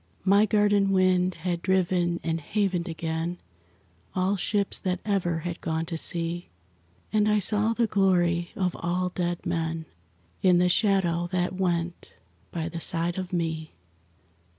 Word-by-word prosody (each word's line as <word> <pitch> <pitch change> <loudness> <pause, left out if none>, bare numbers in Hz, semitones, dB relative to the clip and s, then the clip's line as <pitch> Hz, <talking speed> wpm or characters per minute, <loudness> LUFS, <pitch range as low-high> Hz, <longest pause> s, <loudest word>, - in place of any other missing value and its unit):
My 200 +2 +5
garden 205 -1 +3
wind 185 -1 +2
had 170 0 -3
driven 180 -2 +1
and 165 0 -1
havened 190 0 -1
again 165 +1 -3 0.8
All 190 +2 +1
ships 200 +1 0
that 180 -1 -2
ever 175 -5 0
had 175 +1 -5
gone 160 0 -2
to 165 0 -5
sea, 170 +1 -1 0.6
And 215 0 +3
I 210 - +3
saw 210 +3 +2
the 235 0 +1
glory 175 -4 +2
of 185 -2 -1
all 180 +2 -1
dead 175 -1 -3
men 165 -1 -2 0.6
In 180 -2 +5
the 180 +1 +3
shadow 175 -4 +2
that 180 -1 0
went 175 -2 -2 0.4
by 165 -2 -3
the 165 0 -6
side 170 +1 +2
of 185 -1 -5
me. 160 -3 -3
180 Hz, 145 wpm, -26 LUFS, 170-190 Hz, 0.8 s, My